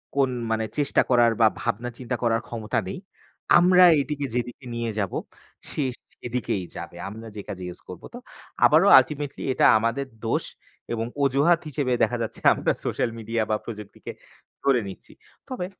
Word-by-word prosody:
কোন 135 -2 +3 0.2
মানে 110 0 0
চেষ্টা 145 -2 +2
করার 120 -2 +5
বা 110 - +8
ভাবনা 120 +1 -2
চিন্তা 125 -1 -3
করার 115 -1 +2
ক্ষমতা 110 -2 -2
নেই। 195 - -5 0.6
আমরা 180 +1 +6 0.2
এটিকে 145 +1 -3
যেদিকে 125 +2 -4
নিয়ে 115 -1 -2
যাব 100 -3 -2 0.6
সে 150 - -1 0.3
সেদিকেই 120 -5 -3
যাবে। - - -8
আমরা 110 +2 -9
যে 105 - -5
কাজে 95 -1 -6
use - - -18
করব। 90 - -9
তো 245 - -7 0.5
আবারও - - +5
ultimately 145 -2 -4
এটা - - +3
আমাদের 115 +5 -1 0.2
দোষ 115 - 0 0.5
এবং 115 -1 -2 0.2
অজুহাত 140 +6 +3
হিসেবে 135 -3 -1
দেখা 120 +2 +1
যাচ্ছে 110 - -6 0.2
আমরা - - 0
সোশ্যাল 120 - 0
মিডিয়া 115 0 -1
বা - - +3
প্রযুক্তিকে 105 -3 -8 0.5
ধরে 135 -3 +4
নিচ্ছি। 95 - -12 0.4
তবে 250 -9 -3
120 Hz, 160 wpm, -25 LUFS, 110-140 Hz, 0.6 s, বা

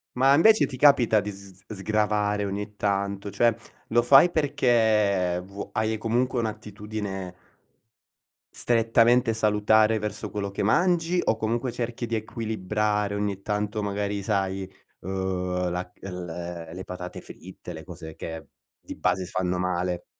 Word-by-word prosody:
Ma 135 +2 +5
invece 215 +9 +6
ti 130 - -7
capita 125 -6 +5
di 105 +1 -4
s 95 -1 -14
sgravare 105 0 0
ogni 105 +1 -5
tanto? 100 0 -1
Cioè, 115 +3 +2 0.3
lo 120 +1 +4
fai 135 +8 +7
perché 110 - +2
vu 100 +1 -8
hai 110 0 0
comunque 120 +3 0
un'attitudine 105 -3 -5 1.2
strettamente 115 +1 +3
salutare 110 0 +3
verso 105 0 -4
quello 100 0 -4
che - - -4
mangi? 175 - +2
O 110 - +1
comunque 115 +3 -1
cerchi 120 0 -4
di 115 0 -2
equilibrare 105 -1 -1
ogni 100 -1 -2
tanto 105 +1 -2
magari 100 0 -2
sai, 95 -2 -2 0.3
uhm, 90 -1 -2
la 90 +1 -4
el 90 -2 -6 0.5
le 95 +2 -6
patate 90 -1 -7
fritte, - - -11
le - - -9
cose 80 0 -10
che 80 -1 -7 0.3
di - - -9
base 95 - 0
si - - -12
fanno 90 0 -1
male. 90 -1 -1
105 Hz, 135 wpm, -26 LUFS, 95-115 Hz, 1.2 s, fai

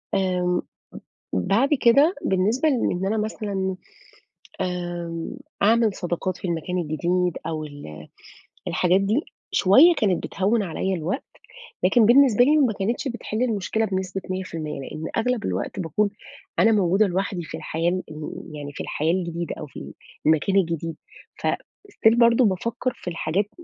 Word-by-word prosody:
آمم 180 -2 +1 0.7
بعد 200 - +2
كده 280 +10 +5
بالنسبة 215 +11 +2
لإن 190 -9 0
أنا 215 +3 0
مثلًا، 205 -3 -2 0.9
آمم 175 -2 -4 0.3
أعمل 225 0 +4
صداقات 175 0 -3
في - - -5
المكان 170 +1 -2
الجديد 175 +2 0
أو 155 -1 -3
ال 145 - -10
آآ 75 0 -10 0.6
الحاجات 185 +2 +2
دي 210 +6 +2 0.3
شوية 270 - +6
كانت 195 -5 +1
بتهوِّن 210 +3 0
عليِّ 190 +2 -2
الوقت، 180 - -2 0.6
لكن 210 +5 +5
بالنسبة 245 -1 +6
لي 300 +3 +4
ما 260 -7 +3
كانتش 220 +8 -2
بتحل 240 -1 -3
المشكلة 220 -1 0
بنسبة 190 -1 -3
100%، 165 -6 -4
لأن 155 +3 -7
أغلب 235 -1 0
الوقت - - -3
باكون 190 +4 0 0.5
أنا 225 - +5
موجودة 200 0 +3
لوحدي 185 -1 -2
في - - -7
الحياة 165 +2 -1 0.2
ال 155 0 -7 0.2
يعني 145 -1 -6
في - - -6
الحياة 160 +2 0
الجديدة 170 -2 -3
أو - - -5
في - - -10
ال 70 - -9 0.3
المكان 160 +5 +3
الجديد. 165 -3 0 0.5
فstill 235 - 0
برضه 235 +1 +5
بافكّر 230 +6 -1
في - - -6
الحاجات 175 +4 -1
190 Hz, 140 wpm, -24 LUFS, 170-220 Hz, 0.9 s, شوية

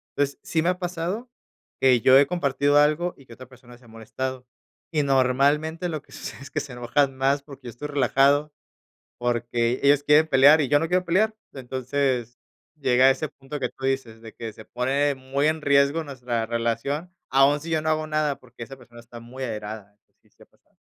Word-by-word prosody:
Entonces, 140 0 -1
sí 160 - 0
me 170 - +1
ha 180 - 0
pasado, 180 +6 -4 0.5
que 125 -3 +4
yo 130 +3 +7
he 140 - +4
compartido 145 -4 +1
algo 155 +4 +2
y 135 - -18
que - - -19
otra 130 +1 -12
persona 125 -1 -16
se 120 - -22
ha - - -18
molestado, 125 +3 -6 0.5
y 155 -2 +1
normalmente, 140 +5 +1
lo 155 -3 -4
que - - -25
sucede - - -8
es 140 - -11
que 145 - -1
se 140 -3 -7
enojan 130 +3 0
más, 135 +2 +1
porque 140 -3 -13
yo - - -5
estoy 120 +6 -7
relajado, 140 +1 +2 0.7
porque 120 0 -1
ellos 145 0 +4
quieren 155 +2 +5
pelear, 145 +3 +6
y 140 - 0
yo 145 - +4
no 165 - -1
quiero 180 +2 +1
pelear. 210 +5 +1 0.2
Entonces, 130 -2 -2 0.4
llega 130 -3 +3
a 135 - +7
ese 155 +3 -1
punto 140 +2 -9
que 125 -2 -2
tú 135 - -6
dices, 125 -4 -3
de 115 - -11
que 115 -2 -7
se 110 +1 -13
pone 140 +4 0
muy 135 +3 -1
en 155 0 -1
riesgo 140 +3 +3
nuestra 125 -5 -3
relación, 120 +9 -2 0.2
aún 135 +2 +4
si 165 - -8
yo 160 -1 0
no 155 - -2
hago 155 0 0
nada, 155 -3 -1
porque 120 -1 -14
esa 135 +3 -8
persona 120 -2 -15
está 120 0 -12
muy 120 +3 -10
airada, 105 -3 -6 0.2
sí, - - -31
sí - - -23
ha - - -34
pasado. - - -37
135 Hz, 210 wpm, -24 LUFS, 125-150 Hz, 0.7 s, yo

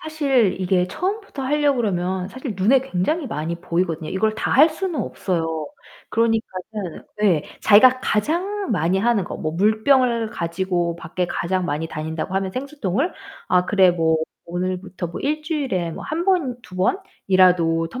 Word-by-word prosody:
사실 275 -11 +1
이게 180 -1 +2
처음부터 385 - -4
하려고 290 0 +2
그러면 185 -3 -1
사실 260 -2 -6
눈에 235 +8 +4
굉장히 270 - -1
많이 165 -5 -3
보이거든요. 170 -3 -2
이걸 215 +3 0
다 - - -2
할 300 +4 +7
수는 330 0 -3
없어요. 165 -4 -2 0.4
그러니까는 220 -4 -2 0.2
예. 175 -8 +3 0.2
자기가 255 +5 +6
가장 350 - -1
많이 180 -1 +1
하는 220 -3 +2
거 - - -6
뭐 155 -1 -3
물병을 225 +4 +2
가지고 175 -1 -1
밖에 175 +2 -3
가장 185 +2 -1
많이 150 0 -2
다닌다고 160 +4 -4
하면 195 -1 0
생수통을 270 - -2 0.4
'아 180 0 +3
그래 190 -2 +5
뭐 165 -2 +2 0.3
오늘부터 180 +1 -4
뭐 170 - -7
1 305 +2 -1
주일에 265 - -2
뭐 - - -8
1 330 +3 -2
번, 300 -11 +1
2 185 0 -12
번이라도 180 - +2
텀블러를 255 - -6
195 Hz, 325 characters per minute, -22 LUFS, 175-265 Hz, 0.4 s, 할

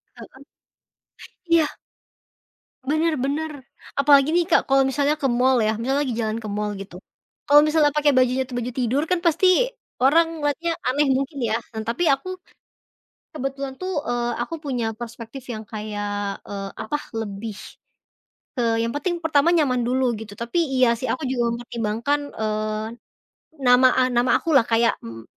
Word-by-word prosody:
Heeh. - - -11 1.2
Iya! 330 -2 +5 1.2
Bener 315 +2 +2
bener. 300 +4 -2 0.5
Apalagi 280 0 +5
nih, 350 -1 +3
Kak, 345 - +4
kalau 270 0 +5
misalnya 285 +2 +1
ke 270 - +1
mall, 250 +1 +3
ya? 220 0 +1
Misalnya 265 +6 0
lagi 245 - -2
jalan 220 -1 -2
ke 220 - -7
mall, 210 0 -2
gitu. 195 -3 -9 0.5
Kalau 290 +1 +8
misalnya 305 -1 +3
pakai 295 0 +3
bajunya 255 +1 +3
tuh 250 - -7
baju 245 +1 -4
tidur 255 +4 0
kan 360 -1 +2
pasti 335 +3 +4 0.5
orang 320 +6 +5
ngeliatnya 300 +3 -1 0.2
aneh 285 +3 +2
mungkin, 275 +2 -1
ya? 225 0 +1 0.2
Nah, 220 - -3
tapi 235 +10 -1
aku, 370 +7 0 1.0
kebetulan 275 -1 -4
tuh, 375 +1 -3 0.2
eee, 240 0 -1
aku 330 - -3
punya 250 -5 -2
perspektif 235 +2 -8
yang 220 -1 -6
kayak, 205 -2 -4
eee, 195 -1 -5
apa, 295 +7 -2 0.2
lebih 205 0 -6 1.0
ke 250 - -4 0.2
yang 230 - -2
penting 345 +5 -2
pertama 300 0 +3
nyaman 255 -6 +2
dulu, 260 +1 +1 0.2
gitu. 205 -2 -9
Tapi, 235 +9 -3 0.2
iya 250 -2 +5
sih, 255 - -4
aku 275 +3 -2
juga 255 -2 0
mempertimbangkan, 235 +4 -2 0.2
eee, 215 0 -2 0.8
nama 250 +1 +6
a 260 - +3
nama 245 +1 +2
aku 335 - -2
lah. 240 -4 +5
Kayak, 230 0 +2
m 115 0 -8
255 Hz, 160 wpm, -23 LUFS, 225-290 Hz, 1.2 s, Kalau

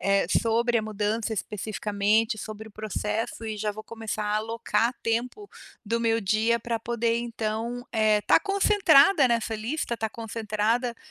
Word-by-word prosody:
eh, 195 -2 +2
sobre 235 +1 +1
a - - -2
mudança 215 +1 -2
especificamente, 210 +1 0
sobre 215 +1 -7
o - - -12
processo 215 +2 -3
e 215 -1 -4
já 210 0 -1
vou 215 +1 -9
começar 225 -2 -5
a 210 0 0
alocar 230 +2 0
tempo 245 - -2 0.4
do 230 +2 0
meu 230 0 +2
dia 220 +3 +2
para 235 -1 -3
poder, 230 0 0
então, 235 +1 -3
eh, 215 -2 +3
estar 210 - +4
concentrada 385 -6 +5
nessa 230 -1 0
lista, 235 +4 -3
estar 220 -1 -2
concentrada, 225 +2 -1
225 Hz, 150 wpm, -26 LUFS, 215-235 Hz, 0.4 s, concentrada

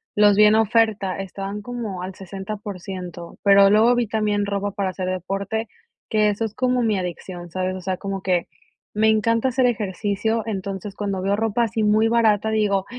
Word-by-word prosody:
los 205 -1 +5
vi 210 - +7
en 210 +1 +5
oferta, 220 -3 +2
estaban 195 +2 -5
como 220 -5 -5
al 185 0 -6
60%, 190 -3 -7
pero 200 -1 +7
luego 220 +4 +5
vi 240 -2 0
también 210 -1 0
ropa 200 0 -2
para 195 -1 -2
hacer 185 0 -4
deporte, 195 +4 -3 0.4
que 215 -1 +3
eso 210 +2 -1
es 215 - -6
como 250 -1 +1
mi 215 -3 +1
adicción, 175 -1 -6
¿sabes? 185 +1 -2
O 185 - -7
sea, 185 +1 -2
como 195 0 -4
que 180 -3 0 0.5
me 220 +1 +3
encanta 230 +3 +2
hacer 255 0 +1
ejercicio. 215 0 -1
Entonces, 195 -1 -5
cuando 200 -2 -3
veo 195 +1 +1
ropa 225 +2 0
así 220 -1 -1
muy 215 +1 +3
barata 220 -2 +2
digo: 205 -3 +1
205 Hz, 180 wpm, -22 LUFS, 190-220 Hz, 0.5 s, vi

